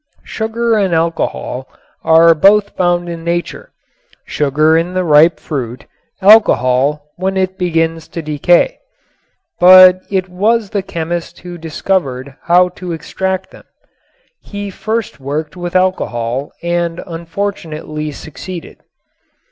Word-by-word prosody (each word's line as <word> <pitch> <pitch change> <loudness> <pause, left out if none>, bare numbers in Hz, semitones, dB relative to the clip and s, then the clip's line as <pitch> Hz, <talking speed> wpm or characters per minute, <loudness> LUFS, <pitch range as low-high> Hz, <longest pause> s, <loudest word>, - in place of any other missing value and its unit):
Sugar 230 +1 -2
and 195 -5 +1
alcohol 160 -5 -2 0.4
are 165 +1 +6
both 200 +5 +4
found 175 -1 0
in 170 -1 -6
Nature; 170 +1 -4 0.5
sugar 150 +2 +1
in 170 +3 -1
the 185 - +1
ripe 155 0 +4
fruit, 125 -5 -5 0.4
alcohol 150 - +4
when 190 +1 -2
it 185 0 -1
begins 165 -3 -1
to 165 - -7
decay. 155 - +2 0.8
But 185 0 +8
it 190 -2 -1
was 210 +4 0
the 205 - -1
chemist 170 -1 -5
who 180 -1 -8
discovered 150 -5 -3
how 180 +1 +3
to 180 -2 -4
extract 190 +3 -4
them. - - -16 0.8
He 205 -1 -7
first 220 0 -4
worked 145 +3 -4
with 175 0 -6
alcohol 135 -8 -1
and 170 0 -2
unfortunately 165 -3 -5
succeeded. 165 +4 -9
170 Hz, 115 wpm, -15 LUFS, 155-185 Hz, 0.8 s, But